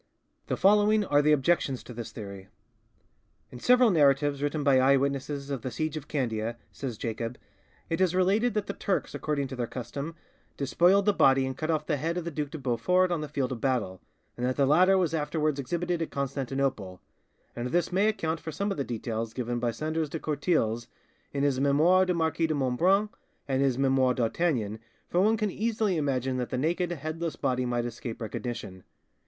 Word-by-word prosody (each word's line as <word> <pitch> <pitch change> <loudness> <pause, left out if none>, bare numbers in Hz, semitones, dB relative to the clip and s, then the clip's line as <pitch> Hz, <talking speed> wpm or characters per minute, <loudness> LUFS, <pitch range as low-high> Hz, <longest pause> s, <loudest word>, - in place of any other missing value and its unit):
The - - -1
following 210 +1 +4
are 145 -4 +3
the 150 +1 +3
objections 140 -2 +1
to 125 - -10
this 115 -1 -7
theory: 100 -3 -8 1.0
"In 125 - -9
several 250 - +5
narratives 145 -3 +3
written 145 +1 -1
by 140 -2 +5
eye 135 +1 +5
witnesses 140 +1 -2
of 135 -4 -3
the 130 - -4
siege 155 +4 -3
of 150 -1 -6
Candia," 115 -5 -2
says 125 -5 -5
Jacob, 115 +2 -4 0.5
"it 165 +3 -1
is 180 -1 +2
related 205 +6 +2
that 210 -2 0
the 200 - -4
Turks, 195 - -2
according 145 -3 -2
to 130 - -5
their 120 -2 -2
custom, 140 +7 -6 0.4
despoiled 175 +8 +3
the 205 - +4
body 135 -6 +4
and 130 0 -4
cut 155 +4 -4
off 155 -2 0
the 150 - 0
head 165 +5 -2
of 175 - -3
the 170 - -3
Duc 150 -1 -3
de 160 - -6
Beaufort 150 +8 +1
on 170 -3 0
the 150 - -4
field 135 -3 -2
of 120 -3 -5
battle, 115 -9 -1 0.3
and 120 - -6
that 125 +1 +1
the 140 - +3
latter 180 +7 +5
was 175 -4 +1
afterwards 155 -1 0
exhibited 175 +5 -2
at 165 - -2
Constantinople; 135 -8 -2 0.6
and 120 +1 -3
this 175 +7 0
may 195 +4 +3
account 165 -7 -1
for 160 - -6
some 200 +6 -2
of - - -3
the 140 - 0
details 115 -2 -4
given 120 -1 -2
by 120 - 0
Sandras 155 +5 -2
de 160 - -4
Courtilz 140 -7 0 0.4
in 140 0 -1
his 140 -2 +1
'Memoires 160 +7 +4
du 180 - +1
Marquis 160 0 +1
de 155 - -1
Montbrun' 175 +11 +2 0.4
and 135 -1 +1
his 135 -3 +2
'Memoires 130 -2 +3
d'Artagnan', 115 -4 0 0.3
for 175 - +1
one 220 +3 +3
can 210 -2 -1
easily 215 -2 0
imagine 135 -4 0
that 125 -1 -2
the 130 - -2
naked, 175 +6 0
headless 160 +1 -4
body 125 -1 -1
might 120 -1 -1
escape 120 -1 -6
recognition. 110 -4 -5
140 Hz, 200 wpm, -28 LUFS, 125-170 Hz, 1.0 s, several